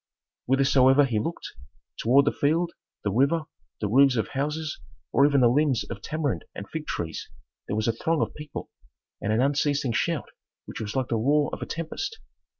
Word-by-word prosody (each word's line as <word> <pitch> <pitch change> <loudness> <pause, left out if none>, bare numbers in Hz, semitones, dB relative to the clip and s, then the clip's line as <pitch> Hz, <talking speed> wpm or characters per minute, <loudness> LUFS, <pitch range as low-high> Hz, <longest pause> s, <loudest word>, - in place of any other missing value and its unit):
Whithersoever 135 +1 +5
he 115 -5 0
looked: 165 +10 -4 0.5
toward 135 +5 +4
the 145 - +3
field, 165 +4 +1 0.3
the 100 - 0
river, 140 +9 +2 0.4
the 105 - 0
roofs 135 +4 +5
of 110 - -1
houses, 150 +3 -3 0.3
or 140 - +5
even 140 -2 +3
the 120 - +7
limbs 130 -1 +2
of - - -6
tamarind 150 -5 -2
and 100 - -7
fig 160 -1 -6
trees 80 -1 -4 0.4
there - - -2
was 110 +1 0
a 115 - +2
throng 160 +7 0
of - - -4
people, 150 -1 -8 0.5
and 105 - -1
an 110 +4 +3
unceasing 145 -1 +1
shout 105 - -1 0.3
which - - -7
was 105 -1 -5
like 130 -2 0
the 115 - +1
roar 145 +6 +2
of - - -5
a - - -4
tempest. 395 - -4
140 Hz, 185 wpm, -26 LUFS, 120-150 Hz, 0.5 s, the